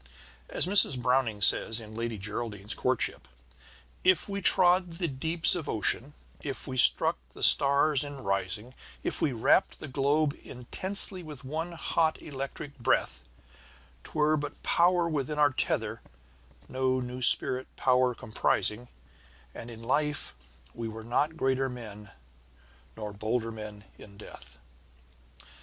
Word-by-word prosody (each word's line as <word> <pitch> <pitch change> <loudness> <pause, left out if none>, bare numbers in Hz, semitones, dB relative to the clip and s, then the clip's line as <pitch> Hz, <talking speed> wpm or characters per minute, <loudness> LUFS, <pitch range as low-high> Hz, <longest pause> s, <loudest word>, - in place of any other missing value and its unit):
As - - +3
Mrs. 185 -9 +6
Browning 120 -4 0
says 110 +3 +5
in 110 -1 -12
Lady 115 0 -5
Geraldine's 105 0 -3
Courtship: 130 -1 0 0.8
If 185 -3 +2
we 200 0 -5
trod 180 -1 +3
the 170 +1 -3
deeps 160 +4 +2
of 175 -4 -4
ocean, 120 +6 0 0.3
if 140 -3 -7
we 130 - -6
struck 125 - +5 0.2
the - - -6
stars 140 0 +4
in 145 -3 -9
rising, 100 +5 -3 0.3
If - - -4
we 145 - +1
wrapped 115 -3 +1
the - - -8
globe 140 +2 0
intensely 185 +9 0
with 150 -5 -11
one 160 +5 -5
hot 165 -1 -1
electric 140 0 -8
breath, 115 - -1 0.8
'Twere 155 0 0
but 145 -1 -7
power 175 0 +2
within 150 -2 -3
our 145 -2 +3
tether, 130 - -3 0.7
no 130 0 -1
new 125 0 -7
spirit 130 +2 +5
power 125 -1 +1
comprising, 110 +2 -2 0.7
And 115 - -10
in 115 -1 -11
life 150 +4 -2 0.4
we 115 -1 -6
were 110 0 -9
not 145 +7 -1
greater 135 -1 -1
men, 105 -4 -10 0.9
nor 105 -2 -7
bolder 115 +3 -3
men 105 -2 -10 0.2
in 100 -1 -15
death. 105 - -14
130 Hz, 135 wpm, -28 LUFS, 115-155 Hz, 0.9 s, Mrs